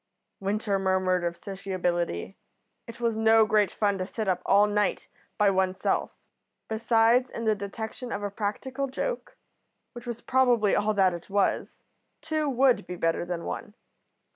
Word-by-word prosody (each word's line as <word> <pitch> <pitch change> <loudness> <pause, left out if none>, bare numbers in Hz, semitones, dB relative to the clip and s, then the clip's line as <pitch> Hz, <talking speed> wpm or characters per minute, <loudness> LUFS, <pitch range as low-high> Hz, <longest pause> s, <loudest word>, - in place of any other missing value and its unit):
Winter 200 0 -1
murmured 185 -1 +1
of 170 0 -2
sociability; 180 - -3 0.5
it 230 - -10
was 230 -2 0
no 220 0 +5
great 210 -1 +3
fun 205 -2 0
to 185 - -1
sit 220 0 -4
up 180 -1 +1
all 200 +1 +6
night 210 -2 0 0.3
by 205 -1 +4
one's 190 -1 0
self. - - 0 0.6
Besides, 230 +2 +3
in 230 - -5
the 220 - +4
detection 220 +4 -6
of 205 - -3
a 205 - -2
practical 255 +7 -3
joke, 485 - -4 0.6
which 240 0 -10
was 235 -1 -4
probably 245 -5 +3
all 215 +1 +1
that 190 -2 +4
it 170 +2 -8
was, 200 0 0 0.4
two 310 -1 -1
would 255 -6 +3
be 180 - -5
better 165 0 0
than 175 -1 -4
one. 210 - -6
210 Hz, 160 wpm, -27 LUFS, 190-230 Hz, 0.6 s, all